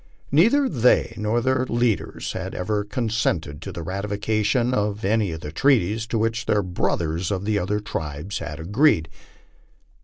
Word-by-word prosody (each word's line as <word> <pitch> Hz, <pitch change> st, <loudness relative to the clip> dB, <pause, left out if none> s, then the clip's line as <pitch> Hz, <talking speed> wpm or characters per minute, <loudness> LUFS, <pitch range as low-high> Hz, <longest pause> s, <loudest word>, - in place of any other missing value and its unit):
Neither 230 Hz, -, +4 dB
they 125 Hz, -, +3 dB
nor 110 Hz, +2 st, 0 dB
their 130 Hz, +1 st, +1 dB
leaders 120 Hz, -3 st, 0 dB
had -, -, -5 dB
ever 105 Hz, +3 st, -1 dB
consented 105 Hz, -, -1 dB
to 95 Hz, -, -6 dB
the 85 Hz, -2 st, -6 dB
ratification 105 Hz, -, 0 dB
of 105 Hz, -2 st, -1 dB
any 105 Hz, -2 st, +1 dB
of 80 Hz, 0 st, -6 dB
the 75 Hz, -, -6 dB
treaties 110 Hz, -, +2 dB
to 115 Hz, -, -1 dB
which 115 Hz, +1 st, -1 dB
their 105 Hz, -1 st, +2 dB
brothers 85 Hz, -1 st, -1 dB
of 100 Hz, -1 st, -2 dB
the 105 Hz, -1 st, +1 dB
other 100 Hz, +3 st, -1 dB
tribes 90 Hz, -3 st, -4 dB
had 75 Hz, +2 st, -6 dB
agreed. 95 Hz, -, +2 dB
105 Hz, 155 wpm, -23 LUFS, 90-115 Hz, -, Neither